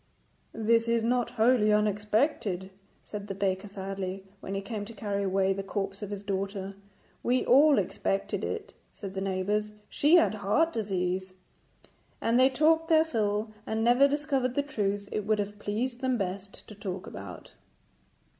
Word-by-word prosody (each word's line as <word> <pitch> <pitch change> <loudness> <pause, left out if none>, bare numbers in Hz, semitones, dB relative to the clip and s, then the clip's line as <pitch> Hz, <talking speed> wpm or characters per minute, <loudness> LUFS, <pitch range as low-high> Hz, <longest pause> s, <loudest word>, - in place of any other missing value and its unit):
'This 230 +1 +2
is 230 -1 +2
not 245 +1 +1
wholly 220 -1 +4
unexpected,' 210 - +1 0.3
said 205 -1 -7
the 195 - -4
baker 195 0 -1
sadly, 195 -1 -5 0.2
when 195 - -5
he - - 0
came 210 0 -5
to 225 +2 -9
carry 200 -1 -2
away 195 0 +2
the 195 - -3
corpse 195 0 -4
of 205 - -5
his 205 -1 -5
daughter. 195 0 -3 0.5
'We 250 +1 +1
all 285 +3 +6
expected 195 +1 -1
it,' - - -4 0.2
said 195 -3 -8
the 190 - -3
neighbours; 200 +2 -1 0.2
'she 300 +4 +4
had 335 -9 +5
heart 215 +11 +1
disease.' 185 -3 -2 0.8
And 230 +2 +2
they 260 +1 +6
talked 320 +4 +3
their 320 -1 +5
fill, 215 -6 -1 0.2
and 220 0 -1
never 245 +4 +6
discovered 275 -3 0
the 285 - +2
truth 205 -7 -2
it 210 -1 -3
would 215 0 +3
have 205 0 -4
pleased 240 +5 -2
them 260 -2 +1
best 195 0 -5
to - - -10
talk 195 -3 -5
about. 95 -2 -9
210 Hz, 165 wpm, -29 LUFS, 195-240 Hz, 0.8 s, all